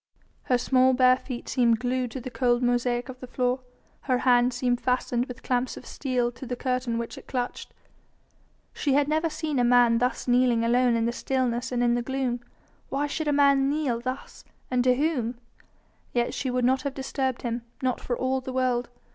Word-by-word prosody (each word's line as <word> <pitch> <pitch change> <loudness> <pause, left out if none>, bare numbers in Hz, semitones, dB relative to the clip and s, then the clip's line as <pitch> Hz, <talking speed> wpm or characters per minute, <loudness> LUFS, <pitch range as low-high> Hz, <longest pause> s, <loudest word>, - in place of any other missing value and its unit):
Her 250 - +3
small 260 +1 +3
bare 255 0 +5
feet 250 -2 -7
seemed 235 -3 +3
glued 250 0 -1
to 260 - -6
the 255 +1 -7
cold 245 0 +1
mosaic 245 0 +1
of 255 -1 -9
the 255 - -8
floor, 250 +1 0 0.5
her 255 - +4
hand 245 -1 +4
seemed 245 0 0
fastened 250 0 0
with 250 - -9
clamps 250 0 -1
of - - -10
steel 250 -3 -1
to 255 +1 -10
the 250 - -3
curtain 250 -2 -1
which 235 0 -5
it - - -18
clutched. 250 -2 -4 1.0
She 280 - 0
had 285 0 +3
never 315 +2 +1
seen 305 -3 -2
a - - +3
man 240 -1 +5
thus 250 +2 -1
kneeling 245 -2 +3
alone 245 0 +3
in 230 0 +1
the 235 - +1
stillness 255 0 -1
and 245 -1 0
in 240 -1 +3
the 240 - +1
gloom. 260 -1 -2 0.5
Why 280 +2 0
should 305 +2 -3
a - - +3
man 280 -1 +4
kneel 285 -5 0
thus? 255 +3 -6 0.3
and 250 -1 +2
to 250 0 +5
whom? 255 -5 -1 0.8
Yet 240 0 0
she 260 - -2
would 250 -1 0
not 260 +1 +2
have 280 -1 -4
disturbed 265 -1 -2
him, 235 0 -2 0.2
not 255 -1 0
for 245 - -2
all 260 0 0
the 260 - -6
world. 250 -2 0
250 Hz, 200 wpm, -26 LUFS, 245-265 Hz, 1.0 s, bare